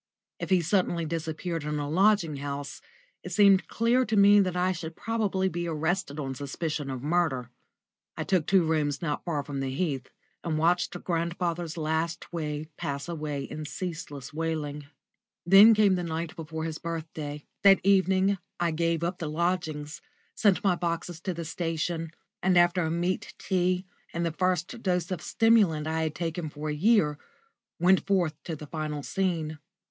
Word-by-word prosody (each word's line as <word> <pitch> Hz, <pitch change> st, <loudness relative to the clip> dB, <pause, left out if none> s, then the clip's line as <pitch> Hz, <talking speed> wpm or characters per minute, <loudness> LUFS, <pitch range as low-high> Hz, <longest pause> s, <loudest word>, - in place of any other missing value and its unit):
If -, -, -4 dB
he 185 Hz, -2 st, +4 dB
suddenly 175 Hz, -1 st, +1 dB
disappeared 165 Hz, +1 st, -3 dB
in 150 Hz, 0 st, -2 dB
a 145 Hz, -1 st, -2 dB
lodging 175 Hz, -2 st, +3 dB
house, 140 Hz, 0 st, -5 dB, 0.4 s
it -, -, -8 dB
seemed 200 Hz, -2 st, +5 dB
clear 235 Hz, +3 st, +2 dB
to 215 Hz, -2 st, 0 dB
me 200 Hz, +1 st, +7 dB
that 185 Hz, -2 st, +1 dB
I 180 Hz, +1 st, +2 dB
should 165 Hz, -2 st, -6 dB
probably 205 Hz, -4 st, 0 dB
be 175 Hz, -1 st, -3 dB
arrested 160 Hz, -1 st, -1 dB
on 135 Hz, -2 st, -3 dB
suspicion 145 Hz, +2 st, -4 dB
of 130 Hz, -1 st, -5 dB
murder. 150 Hz, -7 st, 0 dB, 0.7 s
I -, -, -1 dB
took 180 Hz, -5 st, +1 dB
two 190 Hz, -2 st, +5 dB
rooms 150 Hz, -2 st, 0 dB
not 150 Hz, -3 st, -2 dB
far 155 Hz, -5 st, -2 dB
from 140 Hz, -1 st, -5 dB
the 135 Hz, -1 st, -2 dB
Heath, 135 Hz, -3 st, -2 dB, 0.3 s
and 160 Hz, -2 st, -1 dB
watched 170 Hz, +3 st, +2 dB
grandfather's 170 Hz, -1 st, -2 dB
last 160 Hz, +2 st, -2 dB
week 155 Hz, -1 st, -4 dB
pass 140 Hz, +1 st, -4 dB
away 150 Hz, -4 st, -3 dB
in 155 Hz, +3 st, -6 dB
ceaseless 155 Hz, -6 st, -6 dB
wailing. 150 Hz, -2 st, -3 dB, 0.6 s
Then 200 Hz, +5 st, +8 dB
came 210 Hz, -2 st, +5 dB
the 180 Hz, -1 st, -1 dB
night 165 Hz, 0 st, -4 dB
before 160 Hz, 0 st, -5 dB
his 160 Hz, -1 st, -4 dB
birthday. 155 Hz, -3 st, -5 dB, 0.2 s
That 195 Hz, -1 st, +7 dB
evening 190 Hz, 0 st, +3 dB, 0.2 s
I 170 Hz, -1 st, +1 dB
gave 165 Hz, +1 st, 0 dB
up 175 Hz, +2 st, -2 dB
the 160 Hz, -, -3 dB
lodgings, 155 Hz, -3 st, -2 dB, 0.3 s
sent 205 Hz, -1 st, +2 dB
my 195 Hz, -3 st, +4 dB
boxes 170 Hz, -1 st, -3 dB
to 185 Hz, 0 st, -2 dB
the 170 Hz, 0 st, -5 dB
station, 165 Hz, 0 st, -2 dB, 0.3 s
and 185 Hz, -1 st, +3 dB
after 175 Hz, +1 st, +4 dB
a 160 Hz, -, 0 dB
meat 175 Hz, +2 st, -2 dB
tea 185 Hz, 0 st, 0 dB, 0.3 s
and 170 Hz, 0 st, 0 dB
the 165 Hz, -, 0 dB
first 185 Hz, +5 st, -1 dB
dose 180 Hz, -3 st, 0 dB
of 180 Hz, -4 st, -2 dB
stimulant 205 Hz, -9 st, +3 dB
I 160 Hz, +1 st, -1 dB
had 155 Hz, -1 st, -2 dB
taken 165 Hz, -1 st, -3 dB
for 150 Hz, +1 st, -5 dB
a -, -, -1 dB
year, 150 Hz, -4 st, +3 dB, 0.6 s
went 185 Hz, +3 st, +4 dB
forth 180 Hz, -6 st, +2 dB
to 165 Hz, -, -3 dB
the 150 Hz, -, -9 dB
final 150 Hz, -1 st, -4 dB
scene. 165 Hz, -5 st, -1 dB
165 Hz, 170 wpm, -28 LUFS, 155-185 Hz, 0.7 s, Then